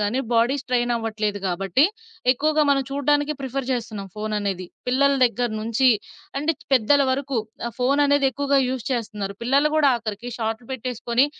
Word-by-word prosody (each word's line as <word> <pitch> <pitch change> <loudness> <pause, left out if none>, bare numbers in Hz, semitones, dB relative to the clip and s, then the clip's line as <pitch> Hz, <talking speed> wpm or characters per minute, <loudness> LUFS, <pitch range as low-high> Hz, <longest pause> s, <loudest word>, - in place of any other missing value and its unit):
గానీ, 210 +5 0
బాడీ 235 +3 +3
స్ట్రెయినవ్వట్లేదు 225 -4 -1
గాబట్టి, 190 - +2 0.5
ఎక్కువగా 305 +4 +1
మనం 275 -1 +3
చూడ్డానికి 290 +1 +1
ప్రిఫర్ 265 0 -3
చేస్తున్నాం 220 -5 -4
ఫోన్ 215 0 -4
అనేది. 195 -3 -3 0.2
పిల్లల 270 +3 +3
దెగ్గర 240 0 0
నుంచి, 230 +4 +2 0.5
అంటే 300 +3 +1 0.2
పెద్దల 270 +3 +4
వరకు, 270 -1 -1 0.3
ఆ - - -1
ఫోననేది 280 +2 +3
ఎక్కువగా 280 +2 +1
యూజ్ 255 -3 -3
చేస్తున్నారు. 210 -4 -3
పిల్లలు 280 +5 +3
గూడా 295 -3 +5
ఆఖరికి 225 +1 -5
షార్ట్‌లు 225 +1 -3
పెట్టేసుకొని, 250 +1 0
245 Hz, 140 wpm, -23 LUFS, 220-275 Hz, 0.5 s, గూడా